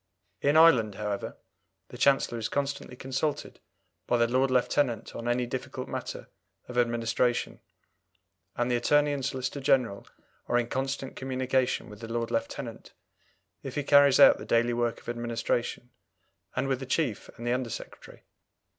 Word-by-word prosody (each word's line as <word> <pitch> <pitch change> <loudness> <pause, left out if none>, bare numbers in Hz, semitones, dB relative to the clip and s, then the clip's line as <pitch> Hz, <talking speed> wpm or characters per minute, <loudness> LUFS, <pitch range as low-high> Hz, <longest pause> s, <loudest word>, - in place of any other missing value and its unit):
In 145 +2 +3
Ireland, 125 -11 +6
however, 105 0 -4 0.5
the - - -10
Chancellor 135 -4 +3
is 110 - -3
constantly 140 -2 -3
consulted 135 +4 -3 0.5
by 120 - +2
the 115 0 +3
Lord 130 +3 +2
Lieutenant 125 -2 +1
on 115 - -5
any 120 +1 +1
difficult 125 +1 -5
matter - - -6 0.4
of 125 - -8
administration, 120 0 0 1.0
and 120 +1 0
the - - +3
Attorney 145 +4 +3
and 140 -2 -3
Solicitor 130 +1 -3
General 125 -7 +1 0.4
are 120 - +2
in 120 -1 0
constant 135 0 -3
communication 130 -1 -1
with 105 -1 -12
the 115 0 -8
Lord 115 0 -2
Lieutenant, 115 - -4 0.7
if - - -7
he 145 - -1
carries 140 -1 +6
out - - +8
the - - -7
daily 120 +1 +2
work 120 -1 -1
of - - -20
administration, 120 +1 -2 0.6
and 130 +1 0
with 135 -2 0
the 135 - -7
Chief 130 -5 -1
and 120 - -8
the 120 - +1
Under 125 -1 -2
Secretary. - - -9
125 Hz, 155 wpm, -28 LUFS, 120-135 Hz, 1.0 s, out